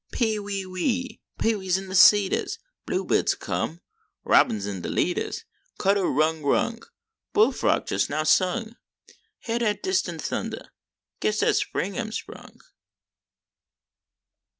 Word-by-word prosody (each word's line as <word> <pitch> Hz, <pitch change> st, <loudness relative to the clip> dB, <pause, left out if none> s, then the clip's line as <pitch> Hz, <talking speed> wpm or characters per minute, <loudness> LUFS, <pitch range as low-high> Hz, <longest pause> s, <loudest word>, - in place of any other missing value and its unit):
"Pee, 220 Hz, -3 st, 0 dB
wee, 200 Hz, -1 st, -4 dB
wee," 235 Hz, +8 st, -2 dB, 0.2 s
pee 225 Hz, 0 st, +2 dB
wees 190 Hz, -2 st, 0 dB
in 195 Hz, 0 st, -7 dB
de 190 Hz, -, -7 dB
cedars, 195 Hz, +1 st, +5 dB, 0.3 s
Bluebirds -, -, +1 dB
come, 165 Hz, +2 st, -3 dB, 0.4 s
robins 105 Hz, -2 st, +3 dB
an 100 Hz, -3 st, -4 dB
de -, -, -5 dB
leaders, -, -, -1 dB, 0.3 s
Cndder 195 Hz, -1 st, +2 dB
rudder 155 Hz, +3 st, +1 dB
rung, 225 Hz, +11 st, 0 dB, 0.5 s
bullfrog 430 Hz, +1 st, +2 dB
just -, -, 0 dB
now 155 Hz, +1 st, -1 dB
sung, 220 Hz, +8 st, +1 dB, 0.7 s
Hyar 235 Hz, 0 st, -1 dB
dat 215 Hz, -3 st, -1 dB
distant 375 Hz, 0 st, -1 dB
thundah; -, -, -4 dB, 0.5 s
guess 215 Hz, 0 st, 0 dB
dat -, -, +3 dB
spring 195 Hz, +6 st, -2 dB
am 220 Hz, -2 st, -3 dB
sprung. -, -, -8 dB
200 Hz, 125 wpm, -25 LUFS, 180-230 Hz, 0.7 s, cedars